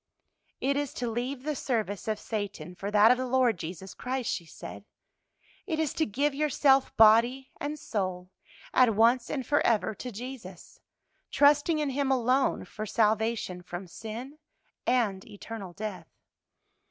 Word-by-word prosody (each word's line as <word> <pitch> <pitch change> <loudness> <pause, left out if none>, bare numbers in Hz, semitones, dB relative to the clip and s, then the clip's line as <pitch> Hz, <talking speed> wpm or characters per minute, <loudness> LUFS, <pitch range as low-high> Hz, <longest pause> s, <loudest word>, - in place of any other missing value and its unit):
"It 280 +1 +1
is 290 -2 -3
to 245 - -2
leave 250 +3 -3
the 305 0 -2
service 220 -7 -2
of 215 -1 0
Satan 205 -6 -5
for 195 +3 -5
that 210 +2 +6
of 250 - +2
the 255 - -2
Lord 250 -6 +2
Jesus 180 +3 -7
Christ," 255 -2 -3
she 170 - -5
said. - - -9 0.8
"It 320 -5 -1
is 315 -3 0
to 320 - 0
give 280 +7 0
yourself 275 -2 +2
body 230 +4 +5
and 295 +1 -3
soul, 185 -7 -3 0.4
at 245 -4 +5
once 235 +3 +4
and 265 -4 -3
forever, 230 -7 +2
to 250 +5 -7
Jesus, 225 -5 -9 0.5
trusting 290 +3 +4
in 295 -2 0
Him 275 +1 0
alone 255 +1 +2
for 215 0 -6
salvation 220 -4 0
from 180 +1 -7
sin 230 - -8 0.5
and 215 -7 +1
eternal 205 -2 -8
death. 190 -3 -6
235 Hz, 150 wpm, -28 LUFS, 205-265 Hz, 0.8 s, that